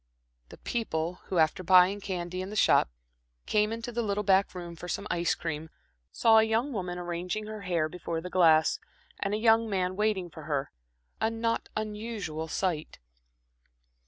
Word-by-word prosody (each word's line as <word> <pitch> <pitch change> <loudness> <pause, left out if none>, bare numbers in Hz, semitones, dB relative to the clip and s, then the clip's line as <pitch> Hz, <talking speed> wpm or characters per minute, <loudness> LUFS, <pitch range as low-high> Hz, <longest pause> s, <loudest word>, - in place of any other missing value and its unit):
The - - -12
people 180 -7 -2
who, 185 - -3
after 160 +2 +3
buying 185 +2 +5
candy 180 -2 -4
in 185 - -5
the 210 - -7
shop, 200 - +4 0.6
came 210 0 +2
into 230 +1 -4
the 235 0 -1
little 210 -2 -1
back 195 -1 +3
room 175 -1 -7
for 175 - -8
some 200 - -3
ice 170 0 +1
cream, 160 -1 -4 0.4
saw 225 -1 +5
a - - +5
young 225 +5 0
woman 180 -4 -3
arranging 180 +4 -3
her 215 -1 -7
hair 175 -5 0
before 170 0 -4
the 170 - -6
glass, 160 -3 +4 0.4
and 200 +1 -1
a - - 0
young 225 0 +4
man 185 -2 -1
waiting 200 -4 0
for 160 -2 -10
her 145 -3 -2 0.5
a 220 - +2
not 230 0 -2
unusual 210 -7 -4
sight. 165 -2 -2
185 Hz, 170 wpm, -29 LUFS, 170-215 Hz, 0.6 s, buying